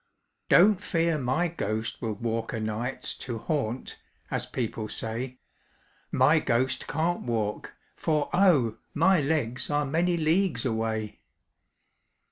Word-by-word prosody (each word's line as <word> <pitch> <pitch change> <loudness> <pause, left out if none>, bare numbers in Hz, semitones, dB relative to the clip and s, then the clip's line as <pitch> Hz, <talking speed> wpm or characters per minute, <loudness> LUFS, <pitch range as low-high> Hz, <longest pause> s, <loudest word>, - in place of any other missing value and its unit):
"Don't 200 +1 +6
fear 165 -2 +1
my 135 +7 +1
ghost 110 -9 -3
will 115 -3 -1
walk 115 +2 -2
o' - - -2
nights 110 +4 -3
To 120 -3 -5
haunt, 130 -2 -3 0.3
as - - 0
people 110 -3 -3
say; 125 +3 -4 0.7
My - - +5
ghost 130 +3 0
can't 165 +4 0
walk, 110 -3 -2 0.2
for, 150 -2 0
oh! 160 - +4 0.2
my 185 +4 +4
legs 125 -5 -1
Are 145 0 +1
many 170 +5 +1
leagues 165 +1 +1
away! 110 -2 -2
130 Hz, 120 wpm, -27 LUFS, 115-160 Hz, 0.7 s, Don't